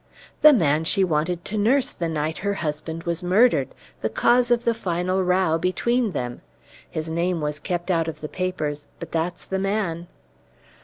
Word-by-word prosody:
"The 305 Hz, -, +10 dB
man 160 Hz, -, +3 dB
she 195 Hz, +4 st, +3 dB
wanted 170 Hz, +1 st, 0 dB
to 215 Hz, +1 st, -2 dB
nurse 250 Hz, +6 st, +2 dB
the 170 Hz, -1 st, -3 dB
night 155 Hz, 0 st, -2 dB
her 200 Hz, 0 st, -1 dB
husband 160 Hz, 0 st, -4 dB
was 170 Hz, 0 st, -2 dB
murdered 205 Hz, +8 st, +3 dB, 0.3 s
the -, -, 0 dB
cause 245 Hz, 0 st, +3 dB
of 240 Hz, -1 st, +2 dB
the 235 Hz, -, +3 dB
final 185 Hz, -2 st, -1 dB
row 180 Hz, -3 st, +2 dB
between 215 Hz, +5 st, 0 dB
them! 125 Hz, -4 st, -4 dB, 0.5 s
His 155 Hz, 0 st, -4 dB
name 170 Hz, +2 st, 0 dB
was 150 Hz, 0 st, -3 dB
kept 175 Hz, +1 st, -2 dB
out 165 Hz, -2 st, +1 dB
of 155 Hz, -2 st, -5 dB
the 150 Hz, -, -4 dB
papers, 155 Hz, -5 st, -3 dB
but -, -, -8 dB
that's 170 Hz, +2 st, -2 dB
the 190 Hz, -, -2 dB
man." 190 Hz, -4 st, -1 dB
175 Hz, 175 wpm, -23 LUFS, 160-195 Hz, 0.5 s, The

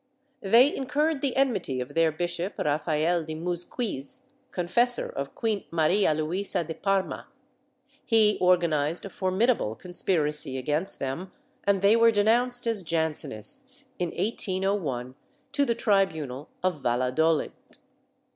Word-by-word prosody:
They 235 Hz, +8 st, +5 dB
incurred 290 Hz, +2 st, 0 dB
the 275 Hz, -3 st, -1 dB
enmity 205 Hz, -, +1 dB
of 125 Hz, -, -5 dB
their 165 Hz, -1 st, +3 dB
bishop, 175 Hz, +3 st, -3 dB
Rafael 155 Hz, +3 st, 0 dB
de 155 Hz, 0 st, -6 dB
Muzquiz, 175 Hz, -, -4 dB, 0.3 s
confessor 235 Hz, +8 st, +1 dB
of 140 Hz, 0 st, -6 dB
Queen 220 Hz, -4 st, -1 dB
Maria 170 Hz, +3 st, +2 dB
Luisa 170 Hz, +4 st, -1 dB
de 160 Hz, 0 st, -6 dB
Parma: 195 Hz, +3 st, -1 dB, 0.8 s
he 220 Hz, -2 st, +3 dB
organized 170 Hz, -3 st, +2 dB
a 200 Hz, -, -7 dB
formidable 190 Hz, -, +1 dB
conspiracy 150 Hz, -, 0 dB
against 150 Hz, +8 st, -1 dB
them 140 Hz, +8 st, -4 dB, 0.3 s
and 200 Hz, -1 st, +2 dB
they 205 Hz, +3 st, +6 dB
were 230 Hz, 0 st, +6 dB
denounced 240 Hz, +4 st, +2 dB
as 225 Hz, -3 st, +1 dB
Jansenists, 170 Hz, -, -2 dB
in 175 Hz, -1 st, -1 dB
1801, 185 Hz, -, -1 dB, 0.4 s
to 280 Hz, +1 st, +2 dB
the 235 Hz, -3 st, 0 dB
tribunal 160 Hz, -, 0 dB
of 180 Hz, -6 st, 0 dB
Valladolid. 130 Hz, +7 st, +1 dB
180 Hz, 120 wpm, -27 LUFS, 155-220 Hz, 0.8 s, they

